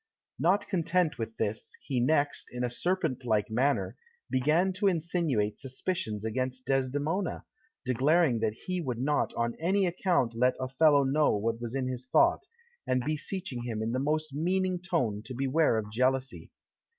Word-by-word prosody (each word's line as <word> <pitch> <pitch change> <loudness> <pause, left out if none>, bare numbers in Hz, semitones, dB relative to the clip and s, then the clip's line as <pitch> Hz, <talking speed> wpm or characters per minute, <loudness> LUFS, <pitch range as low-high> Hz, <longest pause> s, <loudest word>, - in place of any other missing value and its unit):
Not 205 - +2
content 170 -4 0
with 110 0 -5
this, 110 0 -3
he 130 -3 -1
next, 145 +3 +1
in 125 0 -4
a 120 - -1
serpent 160 -3 -1
like 110 -2 0
manner, 135 +5 +1 0.3
began 155 +9 +2
to 200 +2 +1
insinuate 160 - 0
suspicions 130 - -3
against 130 +3 -2
Desdemona, 145 +7 -1 0.4
declaring 135 +1 +3
that 110 0 0
he 185 -1 -2
would 125 -7 -3
not 145 +4 0
on 115 0 0
any 190 +4 +2
account 175 - +1
let 125 +2 +2
Othello 140 +2 +4
know 140 -1 +2
what 115 +2 -2
was 120 +1 -4
in 130 -1 -1
his 130 0 -5
thought, 340 - +3 0.4
and 130 -1 +1
beseeching 155 -2 -3
him 115 -2 -3
in 115 - -1
the 130 - 0
most 155 +1 -1
meaning 185 +4 0
tone 145 - -1
to 125 +3 -8
beware 135 0 +2
of 105 -1 -4
jealousy. 130 +3 0
135 Hz, 160 wpm, -29 LUFS, 120-165 Hz, 0.4 s, Othello